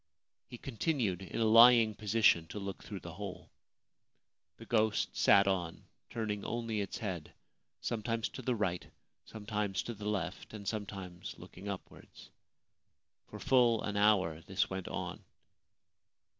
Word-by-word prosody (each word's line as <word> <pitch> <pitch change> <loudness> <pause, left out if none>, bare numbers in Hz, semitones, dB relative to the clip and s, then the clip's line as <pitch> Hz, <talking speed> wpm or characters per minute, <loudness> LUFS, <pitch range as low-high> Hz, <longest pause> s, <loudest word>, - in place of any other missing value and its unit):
He 120 - -9
continued, 120 - -1
in 95 - -5
a 115 - +3
lying 115 0 +8
position, 105 -6 +3
to 95 - -8
look 100 -1 -5
through 100 -2 -7
the 85 - -8
hole. 100 +1 -8 1.1
The - - -11
ghost 110 -2 +1
sat 100 0 +6
on, 90 -4 -1 0.3
turning 105 -3 -3
only 115 -3 -2
its 100 - -4
head, 95 -7 -5 0.5
sometimes 115 0 -1
to - - -8
the 125 -2 0
right, 90 -5 -1 0.4
sometimes 105 -3 -3
to 120 - -5
the 105 -1 -4
left, 100 0 -3
and 100 -2 -8
sometimes 95 -4 -5
looking 100 +3 -9
upwards. 100 -2 -9 1.0
For - - -9
full 120 -4 +3
an 105 - -3
hour 100 -6 +3
this 95 - 0
went 95 -1 -4
on. - - -5
105 Hz, 140 wpm, -33 LUFS, 95-115 Hz, 1.1 s, lying